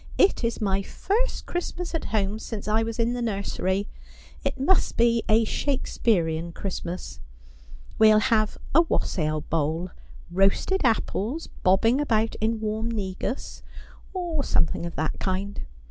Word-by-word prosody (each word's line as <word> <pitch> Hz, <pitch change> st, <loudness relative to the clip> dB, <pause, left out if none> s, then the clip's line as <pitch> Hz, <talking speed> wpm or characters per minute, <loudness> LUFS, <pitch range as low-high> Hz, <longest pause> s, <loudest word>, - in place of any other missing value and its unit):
' -, -, -13 dB
It -, -, -9 dB
is 230 Hz, 0 st, 0 dB
my 195 Hz, -2 st, +1 dB
first 445 Hz, -, -1 dB
Christmas 350 Hz, 0 st, -4 dB
at 325 Hz, -, -2 dB
home, 210 Hz, 0 st, 0 dB
since 220 Hz, -2 st, -6 dB
I 215 Hz, +1 st, +3 dB
was 225 Hz, 0 st, -3 dB
in 235 Hz, 0 st, +1 dB
the 245 Hz, -, -3 dB
nursery. 200 Hz, -2 st, -1 dB, 0.6 s
It -, -, -2 dB
must 350 Hz, +8 st, +2 dB
be 235 Hz, 0 st, +4 dB
a 220 Hz, +1 st, +5 dB
Shakespearian 170 Hz, -, 0 dB
Christmas. 180 Hz, -2 st, -5 dB, 0.8 s
We'll 215 Hz, -1 st, +7 dB
have 215 Hz, 0 st, +2 dB, 0.2 s
a 325 Hz, -, +7 dB
wassail 155 Hz, -, 0 dB
bowl: 165 Hz, +4 st, -1 dB, 0.4 s
roasted 195 Hz, -, +2 dB
apples 235 Hz, -, 0 dB, 0.2 s
bobbing 225 Hz, +8 st, +4 dB
about 225 Hz, -5 st, +1 dB
in 220 Hz, +1 st, +1 dB
warm 220 Hz, +1 st, -1 dB
negus, 205 Hz, +3 st, -4 dB, 0.5 s
or 345 Hz, -6 st, -2 dB
something 170 Hz, -4 st, +1 dB
of 170 Hz, -, -8 dB
that 160 Hz, 0 st, -2 dB
kind. 195 Hz, +1 st, -2 dB
215 Hz, 140 wpm, -26 LUFS, 190-240 Hz, 0.8 s, We'll